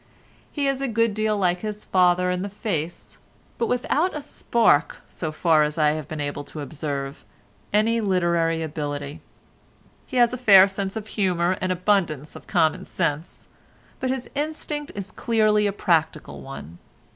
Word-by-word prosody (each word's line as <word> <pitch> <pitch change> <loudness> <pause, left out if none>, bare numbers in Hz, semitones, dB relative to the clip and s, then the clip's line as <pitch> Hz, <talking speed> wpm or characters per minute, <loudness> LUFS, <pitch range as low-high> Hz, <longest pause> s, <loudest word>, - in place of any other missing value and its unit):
He 285 -2 -1
is 275 -1 0
a 275 - 0
good 230 -2 +1
deal 215 0 0
like 180 -2 +1
his 210 -1 -5
father 180 0 +3
in 180 0 -1
the 200 - -3
face, 175 -5 -4 0.4
but 230 - +1
without 295 +8 0
a - - -5
spark—so 220 - 0
far 155 0 +3
as 150 +1 0
I 150 -1 +4
have 155 -2 -4
been 155 - -6
able 145 0 -3
to 150 - -8
observe—any 145 - -3
literary 170 -4 +1
ability; 145 -2 -5 0.9
he 255 - -4
has 240 0 +4
a - - -2
fair 195 -5 +8
sense 195 0 -4
of 220 -2 -4
humour 185 -4 0
and 185 - 0
abundance 180 -6 0
of - - -12
common 160 -5 +2
sense, 165 -1 -3 0.5
but 260 - -1
his 260 -1 -2
instinct 295 0 -3
is 200 0 -6
clearly 215 -2 +2
a - - 0
practical 160 -6 0
one. 85 - -9
185 Hz, 155 wpm, -24 LUFS, 155-220 Hz, 0.9 s, fair